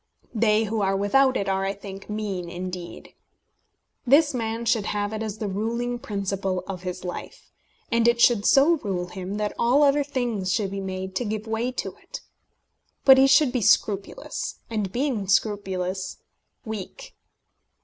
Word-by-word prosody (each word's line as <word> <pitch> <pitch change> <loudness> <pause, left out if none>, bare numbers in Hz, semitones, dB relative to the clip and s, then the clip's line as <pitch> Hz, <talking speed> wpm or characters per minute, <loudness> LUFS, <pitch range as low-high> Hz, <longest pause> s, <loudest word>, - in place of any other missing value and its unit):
They 220 -1 +3
who 220 0 -2
are 195 0 +1
without 260 +7 +3
it 195 - -2
are, 195 0 0
I 195 0 -1
think, 195 0 -10
mean 200 -5 -3
indeed. 180 0 -7 0.9
This 285 +4 +4
man 230 -1 -3
should 225 -2 +1
have 205 0 -2
it 215 - -3
as 215 -1 -4
the 215 - -3
ruling 235 +5 -2
principle 195 -3 -2
of 185 -2 -6
his 180 0 -5
life; 180 - -8 0.4
and 235 0 +3
it 235 0 +3
should 235 -3 +5
so 295 +5 +5
rule 180 -6 -3
him 190 +2 -6
that 210 0 -2
all 255 +5 +4
other 285 0 +4
things 240 -9 -2
should 195 0 0
be 200 0 -4
made 190 0 -5
to - - -1
give 215 -1 -3
way 225 +3 -1
to - - -4
it. - - -9 0.8
But 265 -1 +9
he 270 - +6
should 270 0 +5
be 250 -1 -1
scrupulous, 205 - 0 0.2
and, 210 -4 -2
being 245 -5 -1
scrupulous, 190 -2 -1 0.5
weak. 215 -4 -7
210 Hz, 165 wpm, -25 LUFS, 195-235 Hz, 0.9 s, But